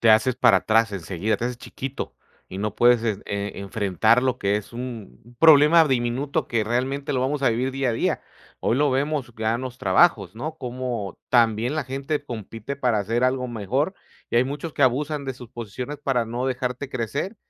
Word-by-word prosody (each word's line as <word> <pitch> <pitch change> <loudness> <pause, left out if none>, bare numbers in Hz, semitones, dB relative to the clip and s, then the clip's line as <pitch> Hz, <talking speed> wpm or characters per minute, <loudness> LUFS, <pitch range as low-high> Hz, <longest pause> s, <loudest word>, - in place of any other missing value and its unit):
Te 115 - +4
haces 110 +3 +4
para 95 -6 +5
atrás 110 +3 +2
enseguida, 100 +3 -2
te 120 - -2
haces 125 0 -3
chiquito 135 +2 -6 0.3
y 95 - -7
no 105 +1 -3
puedes 120 -1 +5
en 105 -4 -1
e 100 0 -4
enfretar, 100 +3 +2
lo 130 -1 0
que 100 +1 +1
es 105 +2 -9
u - - -9
un 120 -1 -8
problema 160 +1 +7
diminuto 130 +4 0
que 115 -2 0
realmente 135 +5 -1
lo 130 - 0
vamos 140 +2 -1
a 135 - +4
vivir 125 +4 0
día 135 -1 0
a 115 - 0
día. - - 0 0.4
Hoy 120 - +1
lo 145 -1 +3
vemos 135 -2 -1
ya 110 +1 +1
en 120 - -4
los 130 -1 -6
trabajos. 110 - +3
¿no? 155 +7 -5
Cómo 120 - -4
también 115 +1 +3
la 155 - -1
gente 135 +3 -3
compite 115 0 -6
para 125 -6 +1
hacer 115 +5 0
algo 130 0 +1
mejor 120 - -1 0.4
y - - -2
hay 120 - +5
muchos 145 +4 -5
que 140 - +1
abusan 140 +3 +1
de 135 - -3
sus 125 -2 -12
posiciones 125 +4 -6
para 125 -4 0
no 120 +3 -3
dejarte 125 +1 -3
crecer. 135 - -3
125 Hz, 200 wpm, -24 LUFS, 110-135 Hz, 0.4 s, problema